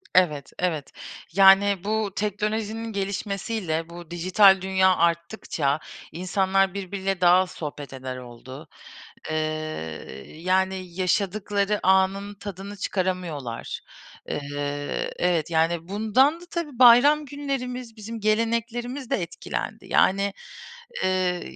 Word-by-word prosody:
Evet, 150 -7 +3
evet. 160 -6 -1 0.4
Yani 195 0 +6
bu 215 0 -1
teknolojinin 215 +2 -2
gelişmesiyle, 195 -3 -2
bu 170 -1 -11
dijital 185 +3 +5
dünya 190 0 +3
arttıkça 170 -3 0 0.3
insanlar 190 +1 +1
birbiriyle 195 -1 -3
daha 175 0 +7
az 185 0 +2
sohbet 145 -4 -7
eder 130 -1 -6
oldu. 125 +1 -10 0.6
Iıı, 155 - 0 1.0
yani 185 +1 0
yaşadıkları 200 +2 0
anın 190 +2 +2
tadını 200 0 -8
çıkaramıyorlar. 180 - -3 0.5
Iıı, 145 0 -3
evet, 170 -2 +1
yani 165 +1 +1
bundan 220 - +2
da - - -11
tabii 300 -8 -4
bayram 265 +5 +7
günlerimiz, 255 -4 -4
bizim 225 +2 -7
geleneklerimiz 235 +4 -1
de 275 - +2
etkilendi. 170 0 -5
Yani, 200 +1 +3 0.7
ııı, 185 -1 +1
190 Hz, 105 wpm, -25 LUFS, 170-215 Hz, 1.0 s, daha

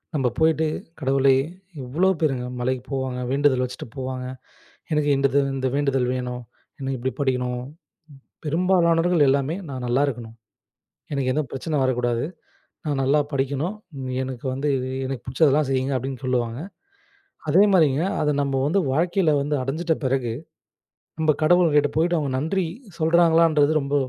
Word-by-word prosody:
நம்ப 135 -3 +1
போயிட்டு, 160 0 +3 0.3
"கடவுளே 135 -1 +3 0.5
எவ்ளோ 170 +10 +2
பேருங்க 130 -5 0
மலைக்கு 130 0 -1
போவாங்க. 130 -2 -2
வேண்டுதல் 135 -2 +2
வச்சுட்டு 125 0 -6
போவாங்க. 130 -1 -4 0.7
எனக்கு 150 -1 +1
இண்டுது 140 0 +2 0.2
இந்த 130 0 -1
வேண்டுதல் 135 -3 +1
வேணும். 125 -1 -4 0.4
எனக்கு 135 -1 -3
இப்படி 130 +2 -2
படிக்கணும்." 125 -2 -1 0.8
பெரும்பாலானவர்கள் 170 -1 +3
எல்லாமே 140 +5 +1
"நான் 130 -2 -5
நல்லா 130 +4 +2
இருக்கணும். 115 -3 -6 0.8
எனக்கு 130 -2 0
எந்தப் 150 -4 -2
பிரச்சனை 150 +3 -3
வரக் 130 -2 +1
கூடாது. 120 0 0 0.6
நான் 140 -2 0
நல்லா 145 +3 +3
படிக்கணும். 140 +9 -1 0.5
எனக்கு 130 -1 -6
வந்து 145 +2 -2
இது 130 +1 -4 0.2
எனக்குப் 130 -2 -6
புடிச்சதெல்லாம் 140 +2 +3
செய்ங்க" 130 +1 0
அப்படின்னு 130 +1 -6
சொல்லுவாங்க. 120 -2 -1 0.9
அதே 185 +7 +6
மாரிங்க 155 -3 +4 0.2
அதை 150 0 +2
நம்ப 140 -1 -1
வந்து 195 +6 +2
வாழ்க்கைல 170 +2 +2
வந்து 145 +1 -1
அடைஞ்சிட்ட 160 +5 -1
பிறகு 130 -3 0 0.9
நம்ம 155 -1 +3
கடவுள் 175 -1 +4
கிட்ட 145 0 +4
போயிட்டு 170 +2 +2
அவங்க 145 -3 -2
நன்றி 175 +6 0 0.3
சொல்றாங்களான்றது 165 -2 +4
ரொம்ப 140 +1 -3
140 Hz, 140 wpm, -23 LUFS, 130-155 Hz, 0.9 s, அதே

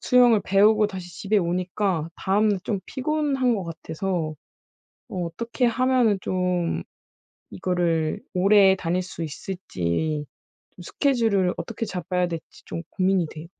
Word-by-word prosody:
수영을 245 -4 +5
배우고 210 +2 +5
다시 185 -3 -7
집에 210 +1 +1
오니까 180 -1 -1
다음날 205 +1 +2
좀 200 -4 -1
피곤한 270 -3 0
것 190 - -4
같아서 165 0 -3 0.8
어 180 -2 -3
어떻게 235 +9 -2
하면은 245 -3 +3
좀 180 -2 -1 0.7
이거를 170 -3 0
오래 195 +1 +6
다닐 180 +1 -1
수 180 -2 -7
있을지 150 - -3 0.5
좀 180 - -13
스케줄을 225 - +1
어떻게 230 0 -4
잡아야 180 -1 -1
될지 165 -2 -8
좀 165 - -5
고민이 185 -2 +1
돼요. 160 +1 -9
190 Hz, 275 characters per minute, -24 LUFS, 170-215 Hz, 0.8 s, 오래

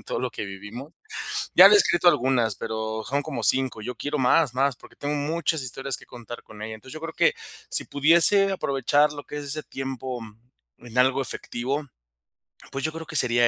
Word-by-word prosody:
de - - -35
todo - - -3
lo 130 -1 -2
que - - -5
vivimo 105 - -9 0.6
Ya - - +11
le - - +7
he - - +9
escrito 175 - +3
algunas, 130 - +3
pero 110 0 -4
son 140 +3 0
como 155 -1 -5
5, 130 -4 +1
yo 125 +3 -4
quiero 145 +5 -3
más, 135 +1 +3
más, 135 0 +2
porque - - -17
tengo 145 +1 -3
muchas 155 +1 -1
historias 135 +1 -4
contar 120 0 -9
con 105 -1 -13
ella. 110 +1 -5
Entonces, 130 +6 -12
yo 155 - -8
creo 165 0 -5
que - - +3 0.4
si - - -1
pudiese 170 +7 +4
aprovechar 145 -3 +2
lo 145 -1 -8
que 150 - -7
es 145 - -5
ese 150 +2 -2
tiempo, 130 -1 -5
mm, 115 - -16
en 120 - -8
algo 130 +2 +4
efectivo, 135 +3 -3 0.8
pues, 135 0 -4
yo 155 - 0
creo 165 0 -7
que 155 - -9
sería 120 -2 +5
135 Hz, 205 wpm, -25 LUFS, 120-150 Hz, 0.8 s, Ya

